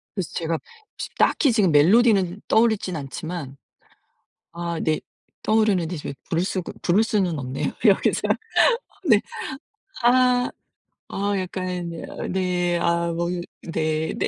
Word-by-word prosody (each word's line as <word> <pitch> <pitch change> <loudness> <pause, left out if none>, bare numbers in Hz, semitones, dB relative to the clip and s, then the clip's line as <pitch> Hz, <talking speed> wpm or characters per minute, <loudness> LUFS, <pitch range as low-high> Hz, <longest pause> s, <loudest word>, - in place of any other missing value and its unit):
그래서 190 -5 -3
제가 165 -1 -1 0.4
지금 - - -6
딱히 280 - +3
지금 205 -6 +3
멜로디는 195 +4 +4
떠오르진 220 -5 +2
않지만. 145 0 -6 0.9
아 170 -1 -4
네. 155 -1 +1 0.4
떠오르는데 205 -6 +2
지금 145 - -5 0.2
부를 170 +1 +1
수가 185 -1 -3
부를 190 +5 +3
수는 190 -7 0
없네요 130 -1 -3
여기서. - - +4 0.9
네. 215 -5 +6 0.8
아. 250 0 +4 0.6
어 200 +1 -1
약간 180 -2 -3
여 165 - -7 0.2
네. 180 -2 0
아 170 0 +1
뭐 170 +1 -1 0.3
네네. 160 -1 -1
180 Hz, 235 characters per minute, -23 LUFS, 165-205 Hz, 0.9 s, 네